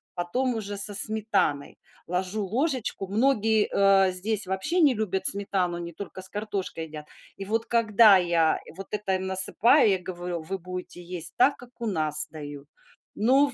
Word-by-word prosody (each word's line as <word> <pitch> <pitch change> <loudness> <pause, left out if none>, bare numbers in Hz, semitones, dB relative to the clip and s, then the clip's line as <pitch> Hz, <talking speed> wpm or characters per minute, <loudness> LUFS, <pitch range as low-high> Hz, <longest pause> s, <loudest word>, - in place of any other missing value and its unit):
потом 240 +9 -2
уже 205 -2 -5
со 205 +1 +3
сметаной. 205 -9 +1 0.3
Ложу 185 +4 -2
ложечку 250 - -2
Многие, 220 -1 +1
а, 195 -1 +4
здесь 200 +2 0
вообще 190 - 0
не 285 -4 +4
любят 195 -4 -3
сметану, 195 -3 0
они 170 -1 -7
только 190 +1 -9
с 190 - -4
картошкой 200 -6 -5
едят. 150 -1 -10 0.3
И 195 - -7
вот 225 +2 -1
когда 220 -3 +5
я 170 -3 +1 0.2
вот 195 +1 -8
это 205 -2 -2
им 190 0 -4
насыпаю, 210 +7 +5
я 190 - +1
говорю: 175 -2 -6
"Вы 190 +4 -5
будете 180 0 -8
есть 175 -2 0
так, 280 +3 +4
как 245 -1 -15
у 235 - -5
нас 155 -6 +1
дают". 145 -2 -10 0.5
Но 265 +6 +3
в 275 - -1
195 Hz, 170 wpm, -25 LUFS, 180-220 Hz, 0.5 s, когда